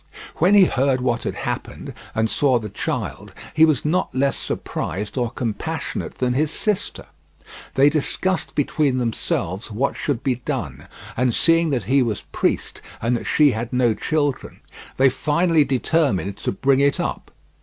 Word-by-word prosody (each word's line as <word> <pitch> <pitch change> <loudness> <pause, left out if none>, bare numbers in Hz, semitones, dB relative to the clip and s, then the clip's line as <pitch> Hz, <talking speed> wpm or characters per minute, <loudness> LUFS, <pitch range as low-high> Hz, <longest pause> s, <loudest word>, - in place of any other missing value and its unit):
When 185 +5 +4
he 200 -2 +8
heard 135 -3 +1
what 120 -2 0
had - - -2
happened - - -5 0.2
and 110 0 +2
saw 130 +2 +2
the 110 -2 -5
child - - -4 0.2
he 160 +1 +6
was 155 -4 +1
not 170 -3 0
less 135 +1 +2
surprised 100 +5 -4
or 120 -3 0
compassionate 135 +6 -4
than 125 -1 0
his 150 +4 +1
sister. 210 +4 -2 0.7
They 135 +2 +6
discussed 160 +5 -1
between 145 -2 +1
themselves 110 -4 -2
what 120 +6 -1
should 140 -5 -2
be 125 -3 -1
done, - - -4 0.3
and 125 -1 +1
seeing 165 -1 +3
that 130 -6 0
he 135 +7 +3
was 115 -5 -1
priest - - -1 0.2
and 115 +2 0
that 120 - -4
she 150 -2 +4
had 115 0 -4
no 125 -3 +2
children, 145 +5 -2 0.4
they 135 - +5
finally 150 +4 +2
determined 130 - 0
to - - -2
bring 135 +7 +2
it 140 0 +2
up. - - -3
135 Hz, 160 wpm, -22 LUFS, 120-150 Hz, 0.7 s, he